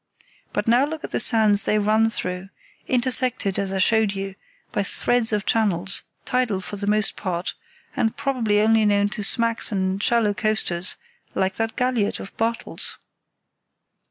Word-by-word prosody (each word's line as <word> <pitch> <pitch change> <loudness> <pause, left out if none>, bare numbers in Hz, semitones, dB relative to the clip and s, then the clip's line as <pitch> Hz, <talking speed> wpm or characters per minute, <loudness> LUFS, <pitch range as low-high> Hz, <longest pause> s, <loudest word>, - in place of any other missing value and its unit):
But 205 - -2
now 240 +3 +5
look 315 +2 -4
at - - -6
the - - 0
sands 215 -3 +3
they 215 - +2
run 215 +2 +3
through, 180 -3 -3 0.4
intersected, 250 -5 +1
as 195 -1 -2
I 195 - -2
showed 215 +2 +3
you, 195 0 -4 0.4
by - - 0
threads 245 -2 +1
of 210 -2 -1
channels, 195 -5 +1 0.2
tidal 250 -6 0
for 190 - -7
the 200 0 -5
most 210 0 +2
part, 180 -1 -3 0.4
and 235 -5 0
probably 225 -7 +1
only 220 0 +4
known 205 -1 +3
to 210 - -4
smacks 230 +3 +1
and 190 -1 -1
shallow 225 -2 +2
coasters, 190 -4 0 0.4
like 190 0 +1
that 225 0 -2
galliot 250 -5 0
of 195 - -9
Bartels. 230 +1 -2
215 Hz, 155 wpm, -23 LUFS, 195-230 Hz, 0.4 s, now